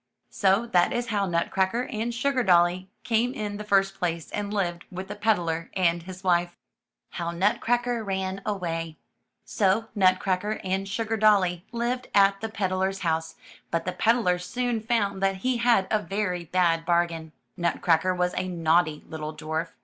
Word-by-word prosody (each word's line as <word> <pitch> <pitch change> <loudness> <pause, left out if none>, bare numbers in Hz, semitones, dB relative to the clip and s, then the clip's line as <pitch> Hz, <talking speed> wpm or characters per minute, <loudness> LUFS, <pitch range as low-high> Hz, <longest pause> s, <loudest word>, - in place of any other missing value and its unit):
'' - - -52
So 195 +3 +2
that 180 -7 +3
is 240 -1 -2
how 200 -3 0
Nutcracker 190 +6 0
and 230 -1 -3
SugardoUy 190 -9 +2 0.2
came 240 +3 +1
in 205 -4 -4
the 210 - -6
first 195 -2 +2
place 170 -2 -2
and 205 -1 -3
lived 175 -4 -2
with 185 +1 -7
the 205 - -5
peddler 175 -6 0
and 170 -2 +2
his 185 +2 -10
wife. 175 -1 +1 0.6
HOW 170 -1 -3
NUTCRACKER 235 +7 0
RAN 190 -1 -3
AWAY 165 -5 -3 0.5
So 215 +2 +1
Nutcracker 190 +1 +1
and 190 +1 -1
SugardoUy 210 -4 +2
lived 245 +1 -2
at 195 0 +4
the 225 - -3
ped 200 -4 -2
dler*s 190 +1 -1
house, 160 -2 -1 0.3
but 165 0 -1
the 185 - -1
peddler 220 -6 +2
soon 240 +6 -2
found 215 -4 0
that 195 0 +2
he 255 -1 +2
had 235 -5 +3
a 215 - +3
very 195 -4 -2
bad 170 -1 +2
bargain. 170 -2 0 0.2
Nutcracker 170 0 +1
was 180 0 0
a 185 - -2
naughty 165 -3 +1
little 155 -1 -6
dwarf. 160 +2 -3
190 Hz, 160 wpm, -26 LUFS, 175-215 Hz, 0.6 s, at